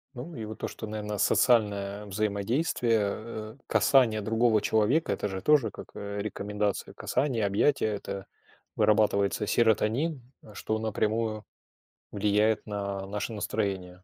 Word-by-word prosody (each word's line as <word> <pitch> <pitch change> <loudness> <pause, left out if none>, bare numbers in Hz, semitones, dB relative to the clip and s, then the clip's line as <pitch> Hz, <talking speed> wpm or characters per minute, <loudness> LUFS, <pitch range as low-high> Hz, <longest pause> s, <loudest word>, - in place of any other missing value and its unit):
Ну, 145 +8 -7
и 110 -3 -5
вот 110 0 -8
то, - - -3
что, 110 - -7
наверно, 105 -1 -4
социальное 105 -4 +2
взаимодействие, 110 - 0
э, 110 +3 -5
касание 120 -6 +4
другого 110 +1 +2
человека- 110 +11 +2
это - - -1
же 95 -2 -5
тоже 140 -6 +3
как, - - -10
э, 100 0 -5
рекомендация 105 0 -2
касания, 125 -5 0
объятия. 105 +5 +2
Это 100 -2 -4 0.5
вырабатывается 105 -1 +2
серотонин, 120 +8 +1 0.2
э, 105 - -15
что 110 +1 -2
напрямую 110 0 -1 0.7
влияет 105 +1 +2
на 100 -1 -3
наше 105 +3 -3
настроение. 95 -4 -3
105 Hz, 130 wpm, -28 LUFS, 100-115 Hz, 0.7 s, касание